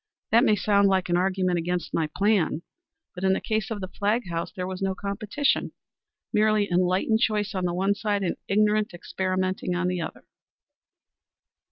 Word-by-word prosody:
That 230 Hz, +2 st, +6 dB
may 215 Hz, -6 st, +4 dB
sound 200 Hz, -1 st, +3 dB
like 190 Hz, -2 st, +1 dB
an 175 Hz, -, +2 dB
argument 185 Hz, -1 st, +1 dB
against 175 Hz, -1 st, -3 dB
my 155 Hz, -2 st, 0 dB
plan, 195 Hz, -5 st, +2 dB, 0.5 s
but 180 Hz, -, -8 dB
in 190 Hz, 0 st, +4 dB
the -, -, 0 dB
case 215 Hz, -2 st, -2 dB
of 215 Hz, -3 st, -4 dB
the 185 Hz, -, -4 dB
Flagg 210 Hz, +4 st, -1 dB
house 170 Hz, 0 st, -3 dB
there 180 Hz, -, -4 dB
was 185 Hz, 0 st, -5 dB
no 190 Hz, -1 st, 0 dB
competition; 205 Hz, +8 st, -1 dB, 0.6 s
merely 215 Hz, -1 st, +3 dB
unenlightened 185 Hz, +5 st, +2 dB
choice 210 Hz, -3 st, 0 dB
on 185 Hz, -2 st, -1 dB
the 175 Hz, -, 0 dB
one 195 Hz, +2 st, +2 dB
side 205 Hz, -1 st, -1 dB
and 180 Hz, -, -1 dB
ignorant 210 Hz, -1 st, +2 dB
experimenting 185 Hz, 0 st, -2 dB
on 180 Hz, 0 st, 0 dB
the 180 Hz, -1 st, -1 dB
other." 160 Hz, -, -7 dB
190 Hz, 175 wpm, -26 LUFS, 180-210 Hz, 0.6 s, That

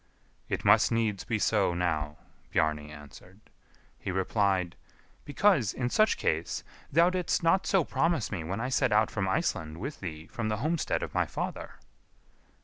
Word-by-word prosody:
"It -, -, -3 dB
must -, -, +5 dB
needs 110 Hz, -4 st, 0 dB
be 115 Hz, -, 0 dB
so 100 Hz, -4 st, +2 dB
now," 80 Hz, -4 st, -1 dB, 0.3 s
Bjarni 75 Hz, -1 st, 0 dB
answered. 75 Hz, +6 st, -13 dB, 0.6 s
He -, -, -5 dB
replied, 95 Hz, -1 st, 0 dB, 0.5 s
"Because, 145 Hz, -, +2 dB
in 125 Hz, -1 st, -2 dB
such 215 Hz, 0 st, +3 dB
case, -, -, -1 dB, 0.3 s
thou 170 Hz, +2 st, +5 dB
didst 180 Hz, -2 st, 0 dB
not 170 Hz, +3 st, +3 dB
so 190 Hz, -3 st, +3 dB
promise 140 Hz, -4 st, 0 dB
me 90 Hz, -6 st, -3 dB
when 95 Hz, +6 st, -3 dB
I 125 Hz, +3 st, -2 dB
set 130 Hz, -, +1 dB
out 105 Hz, +1 st, +3 dB
from 95 Hz, -3 st, -1 dB
Iceland 80 Hz, -4 st, -1 dB
with 140 Hz, +9 st, -5 dB
thee 80 Hz, -4 st, -6 dB
from 110 Hz, +3 st, -4 dB
the 105 Hz, -, -1 dB
homestead 155 Hz, +7 st, -1 dB
of -, -, -6 dB
my -, -, +1 dB
father." -, -, -5 dB
105 Hz, 160 wpm, -29 LUFS, 90-135 Hz, 0.6 s, must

